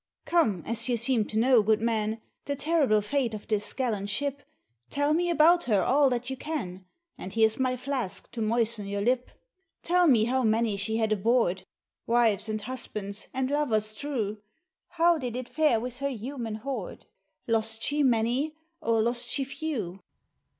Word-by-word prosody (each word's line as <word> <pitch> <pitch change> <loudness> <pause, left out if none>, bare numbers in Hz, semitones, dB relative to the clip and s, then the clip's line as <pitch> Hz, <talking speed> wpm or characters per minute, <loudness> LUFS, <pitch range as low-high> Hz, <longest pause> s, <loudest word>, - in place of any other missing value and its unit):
"Come, 225 - +2
as 230 +1 -1
you 240 - +2
seem 235 -1 +2
to 215 - -5
know, 245 +1 +5
good 215 +1 +2
man, 220 -1 -1 0.2
The 285 - -2
terrible 280 -8 +2
fate 235 +1 -1
of 210 - -9
this 210 -1 -1
gallant 215 -7 -2
ship, 285 +6 -2 0.5
Tell 285 +1 +1
me 350 +2 +1
about 340 +1 +5
her 205 -6 +2
all 275 +5 +4
that 245 -1 -2
you 265 - -3
can; 225 - -5 0.3
And 185 - -7
here's 220 +1 +3
my 255 -1 +1
flask 250 -8 -4
to 230 - -5
moisten 225 -1 +1
your 200 0 -2
lip. 250 +2 +1 0.5
Tell 355 0 +3
me 235 -7 +5
how 255 +3 +1
many 220 -1 +2
she 210 +3 -1
had 220 -1 0
aboard, 215 -3 +1 0.4
Wives, 230 -3 +2
and 215 0 -2
husbands, 210 -4 -5
and 260 +1 -2
lovers 220 -8 +1
true, 215 -5 -3 0.5
How 340 -1 +3
did 245 -3 -4
it 250 -1 -4
fare 300 -7 +2
with 245 +2 -6
her 280 0 -1
human 240 -2 -5
hoard? 260 +5 -6 0.4
Lost 225 -1 0
she 295 +1 +1
many, 255 +4 +1 0.3
or 225 -1 +2
lost 240 +1 +1
she 275 - +1
few?" 260 - -4
235 Hz, 170 wpm, -27 LUFS, 215-275 Hz, 0.5 s, know